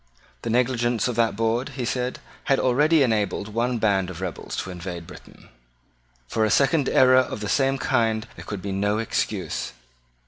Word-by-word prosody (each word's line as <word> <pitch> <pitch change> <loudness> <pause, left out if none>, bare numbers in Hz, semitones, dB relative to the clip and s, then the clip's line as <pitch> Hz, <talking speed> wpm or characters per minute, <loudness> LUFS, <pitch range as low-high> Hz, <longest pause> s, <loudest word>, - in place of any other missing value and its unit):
The - - -4
negligence 120 -1 +1
of 125 - -2
that 115 -3 +2
board, 115 +3 -1
he 125 - -2
said, 125 +1 -2 0.3
had 135 - +3
already 150 +4 +4
enabled 105 -3 0
one 120 +3 0
band 100 -4 +1
of 90 -3 -8
rebels 95 -3 -5
to 90 - -7
invade 90 -1 -6
Britain. - - -14 0.8
For 110 - 0
a 110 - +2
second 140 - +3
error 130 0 +5
of 130 -4 +1
the 105 - -4
same 135 +4 +2
kind 115 -4 +1
there - - -10
could 100 -3 -6
be 100 - -3
no 105 +2 0
excuse. 105 - -2
115 Hz, 175 wpm, -24 LUFS, 100-125 Hz, 0.8 s, error